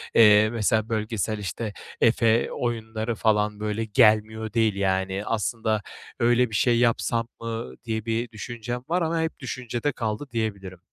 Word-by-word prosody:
eee, 105 -1 +7
mesela, 110 -1 0
bölgesel, 110 -1 -1
işte, 105 +1 -4 0.3
Efe 115 0 +3
oyunları 110 -1 -3
falan 105 -1 +1
böyle 105 +1 -2
gelmiyor 110 -1 +3
değil, 110 -3 +2
yani. 95 0 0
Aslında 110 -1 -1 0.4
öyle 120 +1 +3
bir 110 - -5
şey 120 +2 +3
yapsam 115 -1 +1
mı 115 0 -5
diye 110 -2 -3
bir 115 +1 -2
düşüncem 120 +2 -5
var 180 +2 +1
ama 165 0 0
hep 160 0 -3
düşüncede 125 +1 -3
kaldı 115 +2 -3
diyebilirim. 100 -5 -3
110 Hz, 145 wpm, -25 LUFS, 105-120 Hz, 0.4 s, eee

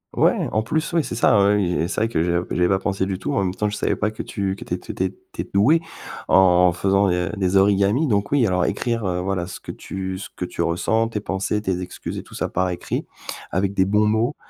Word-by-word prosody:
Ouais, - - +2
en 110 - +1
plus 155 +9 -2
oui. 165 -2 +3
C'est - - -5
ça, 110 -2 +4
oui, 100 +1 +4
oui, 95 -4 +1
et 85 0 0
c'est - - -2
vrai 110 - +3
que 115 -8 -1
j'ai 85 +1 +1
j'avais 90 0 +2
pas 95 - +2
pensé 95 -1 -1
du 95 -1 -2
tout. 95 - -3
En - - +1
même 90 0 -2
temps 105 - 0
je 105 - -4
savais - - 0
pas 105 - -1
que 110 - -6
tu 100 -3 -3
que - - -9
tu - - -3
es - - -5
tu - - -8
étais 95 0 -1
que 95 - -17 0.2
tu - - -4
es - - -9
doué 140 +12 +5 0.5
en 90 -1 +5
faisant 100 +3 +2
des 90 0 0
des 95 -1 +1
origamis. 100 +7 +3
Donc 100 -4 0
oui, 140 -4 +4
alors 90 -3 +1
écrire, 115 +2 -1
heu, 90 -1 -1
voilà 95 -2 -2
ce 90 - -8
que - - -8
tu 95 -1 -5
ce 100 - -7
que 90 - -3
tu 85 - -5
ressens, 110 +7 +1
tes 115 -2 -3
pensées, 100 +1 -2
tes 95 -2 -1
excuses 90 - -6
et - - -8
tout - - -14
ça - - -1
par 95 0 0
écrit, 90 - -4 0.4
avec 95 +2 0
des 95 -1 +2
bons 105 +2 +2
mots, 110 +6 +1
95 Hz, 275 wpm, -22 LUFS, 90-105 Hz, 0.5 s, doué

